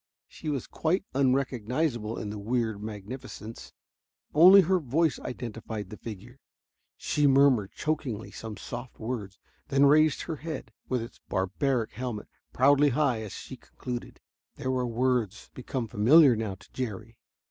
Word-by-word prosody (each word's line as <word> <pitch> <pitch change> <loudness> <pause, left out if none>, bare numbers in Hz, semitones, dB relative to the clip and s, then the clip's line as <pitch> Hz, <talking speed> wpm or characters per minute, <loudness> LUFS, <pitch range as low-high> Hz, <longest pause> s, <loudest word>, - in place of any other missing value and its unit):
She 155 - -7
was 140 -5 -2
quite 180 +5 -1
unrecognizable 130 -2 0
in 105 - -4
the 105 - -6
weird 110 -1 -1
magnificence. 110 +2 -8 0.6
Only 185 +6 +9
her 185 +1 +2
voice 155 +2 +1
identified 110 -4 -6
the 105 - -7
figure. 115 +4 -9 0.6
She 150 -1 +1
murmured 135 -7 +4
chokingly 140 -8 -3
some 110 -2 -7
soft 120 +1 -8
words, 110 -4 -5 0.3
then 140 +1 +4
raised 155 +1 +4
her 160 -3 -4
head 160 +1 -6 0.2
with 125 -3 0
its 115 - -11
barbaric 115 +6 0
helmet 120 -4 -5 0.2
proudly 145 +3 +5
high 130 -4 +1
as 105 -3 -7
she - - -8
concluded. 125 -1 -7 0.4
There 130 - -2
were 125 -1 0
words 120 -3 -1
become 125 -1 -4
familiar 125 +7 +6
now 110 -3 -3
to 95 - -20
Jerry. 115 -2 -5
125 Hz, 140 wpm, -28 LUFS, 110-140 Hz, 0.6 s, Only